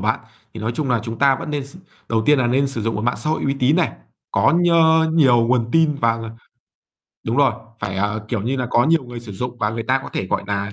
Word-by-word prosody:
bạn. 110 +3 0 0.3
Thì 110 - -7
nói 115 +2 -2
chung 140 -2 -2
là 120 -2 +2
chúng 115 0 -6
ta 140 -1 +4
vẫn 155 - -6
nên 145 -2 -3
s 140 - -12 0.3
đầu 110 -1 +1
tiên 150 -1 +5
là 125 - +2
nên 135 +3 +2
sử 120 -5 -4
dụng 115 0 -1
một 105 - -3
mạng 120 - 0
xã 155 - -2
hội 160 - -1
uy 135 - 0
tín 135 +5 +3
này, 180 - +1 0.4
có - - +3
nhơ 160 -2 +4
nhiều 125 -8 +4
nguồn 120 -1 +1
tin 160 -2 +3
và, 115 -5 +1
ờ 115 -1 -6 0.9
đúng 115 +2 -1
rồi, 140 -4 +4 0.3
phải, 95 - -3
ờ, 105 +2 -2
kiểu 110 -4 -2
như 125 +5 -1
là, 130 -1 -2
có 120 - +3
nhiều 160 -2 +2
người 120 -1 -8
sử 115 -3 -9
dụng, 120 +5 -5
và 105 -1 0
người 115 +1 -4
ta 130 +4 +1
có - - -7
thể, - - -3
gọi - - -1
nà, 100 0 -3
120 Hz, 275 wpm, -20 LUFS, 115-140 Hz, 0.9 s, tiên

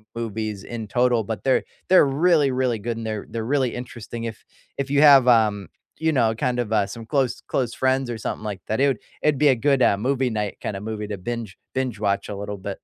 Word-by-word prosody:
movies 110 -3 -4
in 115 -3 -6
total, 120 +1 +2
but 105 -2 -5
they're 130 - +2 0.3
they're 185 -4 +7
really, 150 +1 +3
really 125 -3 0
good 115 +2 -3
and 115 - -5
they're 110 -2 -4
they're 115 -1 -4
really 130 -1 0
interesting. 120 -1 -7
If 115 -1 -7 0.4
if 140 0 -2
you 140 +1 +3
have, 140 -4 +8
um, 105 -5 +3 0.3
you 160 0 +2
know, 115 -6 +2
kind 125 +2 -1
of, 115 -2 -2
uh, 105 -2 +2
some 115 +3 -8
close 130 -2 0
close 125 -3 -1
friends 130 -1 +1
or 120 - -3
something 110 - -5
like 105 -3 -5
that, 110 - -1
it 140 - +4
would 130 -6 0 0.2
it'd 150 -3 +2
be 150 +1 +4
a 130 - +5
good, 135 +2 +2
uh, - - +4
movie 130 +4 0
night 105 -2 -3
kinda 100 -1 -4
movie 105 -1 -4
to 100 -1 -4
binge 115 -1 -5 0.2
binge 130 -4 -2
watch 100 -1 -1
a 105 - -4
little 100 +1 -5
bit. 100 +1 -5
115 Hz, 235 wpm, -23 LUFS, 105-130 Hz, 0.4 s, have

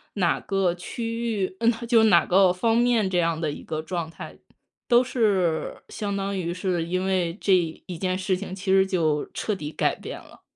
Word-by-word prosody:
哪 180 -5 +1
个 195 -3 0
区 230 +5 -4
域 185 0 -2
嗯， 235 +1 +5 0.2
就 230 -2 +5
哪 175 -7 +5
个 190 0 +5
方 225 +6 +1
面， 235 -4 +3
这 180 -2 +1
样 165 -1 0
的 155 - -1
一 - - -8
个 155 0 -4
状 170 0 -4
态， 165 - -10 0.5
都 240 0 +6
是 205 -10 0
相 200 -1 -4
当 195 0 -2
于 175 -2 -2
是 180 -2 -1
因 185 +2 -1
为 185 -3 0
这 195 - +4 0.3
一 180 - -6
件 185 +1 -1
事 190 0 0
情 185 0 -6
其 190 0 -6
实 190 0 +5
就 160 -6 0
彻 215 - -2
底 150 -5 -6
改 - - 0
变 - - -8
了。 - - -17
190 Hz, 215 characters per minute, -25 LUFS, 175-205 Hz, 0.5 s, 都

